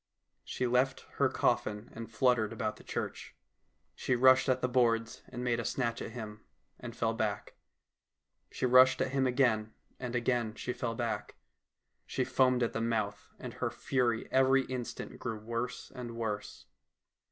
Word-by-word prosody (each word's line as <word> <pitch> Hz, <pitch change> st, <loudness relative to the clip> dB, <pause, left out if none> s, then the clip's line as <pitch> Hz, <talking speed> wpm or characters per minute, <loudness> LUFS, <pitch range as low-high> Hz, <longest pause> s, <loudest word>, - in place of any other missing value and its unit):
She 130 Hz, -, -2 dB
left 125 Hz, +2 st, +2 dB, 0.2 s
her -, -, +4 dB
coffin 105 Hz, +2 st, 0 dB
and 115 Hz, 0 st, -7 dB
fluttered 115 Hz, -1 st, +2 dB
about 110 Hz, -1 st, -3 dB
the -, -, -15 dB
church. -, -, -5 dB, 0.6 s
She 130 Hz, -, 0 dB
rushed 130 Hz, +1 st, +6 dB
at 130 Hz, -, +3 dB
the -, -, +2 dB
boards 115 Hz, -2 st, +1 dB
and 125 Hz, -1 st, -5 dB
made 120 Hz, -1 st, +1 dB
a -, -, -2 dB
snatch 120 Hz, -2 st, -1 dB
at -, -, -4 dB
him, 105 Hz, -3 st, -8 dB, 0.4 s
and 120 Hz, -1 st, -7 dB
fell 115 Hz, -1 st, +1 dB
back; 110 Hz, -3 st, -2 dB, 1.0 s
she -, -, -2 dB
rushed 130 Hz, +1 st, +6 dB
at 130 Hz, -, 0 dB
him 135 Hz, -1 st, +2 dB
again, 120 Hz, -4 st, +1 dB, 0.2 s
and 125 Hz, -1 st, -4 dB
again 120 Hz, -2 st, 0 dB
she 125 Hz, -, -3 dB
fell 115 Hz, -2 st, -3 dB
back. 115 Hz, -1 st, -3 dB, 0.7 s
She -, -, 0 dB
foamed 130 Hz, -1 st, +3 dB
at 115 Hz, -, -1 dB
the 115 Hz, -, -2 dB
mouth, 110 Hz, -3 st, -1 dB
and -, -, -7 dB
her -, -, -2 dB
fury 120 Hz, -4 st, 0 dB
every 135 Hz, 0 st, +4 dB
instant 125 Hz, -2 st, -6 dB
grew 115 Hz, -3 st, -3 dB
worse 115 Hz, +3 st, -4 dB
and 120 Hz, -2 st, -7 dB
worse. 105 Hz, -3 st, -4 dB
120 Hz, 165 wpm, -32 LUFS, 115-125 Hz, 1.0 s, rushed